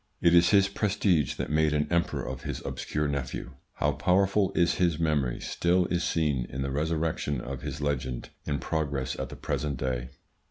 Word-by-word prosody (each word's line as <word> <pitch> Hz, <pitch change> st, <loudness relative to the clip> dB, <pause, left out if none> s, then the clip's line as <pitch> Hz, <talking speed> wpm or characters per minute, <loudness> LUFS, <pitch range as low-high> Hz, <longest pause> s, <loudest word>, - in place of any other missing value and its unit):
It 85 Hz, -, +4 dB
is 85 Hz, 0 st, +6 dB
his 100 Hz, -2 st, +5 dB
prestige 100 Hz, -, +1 dB
that -, -, -4 dB
made 75 Hz, 0 st, +3 dB
an 75 Hz, 0 st, +2 dB
emperor 85 Hz, 0 st, 0 dB
of -, -, -5 dB
his -, -, -4 dB
obscure 75 Hz, 0 st, -2 dB
nephew. 70 Hz, -3 st, -3 dB, 0.2 s
How -, -, +1 dB
powerful 95 Hz, +2 st, +2 dB
is 85 Hz, -, +3 dB
his 85 Hz, -3 st, +3 dB
memory 75 Hz, -6 st, 0 dB
still 90 Hz, +1 st, +1 dB
is 85 Hz, -1 st, +1 dB
seen 75 Hz, -7 st, 0 dB
in 65 Hz, +1 st, -3 dB
the 70 Hz, -, -2 dB
resurrection 75 Hz, -1 st, -1 dB
of 65 Hz, +1 st, -6 dB
his 70 Hz, 0 st, -5 dB
legend 65 Hz, -4 st, -2 dB, 0.2 s
in 70 Hz, -, -1 dB
progress 70 Hz, -2 st, -2 dB
at -, -, -3 dB
the -, -, -8 dB
present 75 Hz, -3 st, -2 dB
day. 65 Hz, -1 st, -2 dB
75 Hz, 185 wpm, -28 LUFS, 70-85 Hz, 0.2 s, is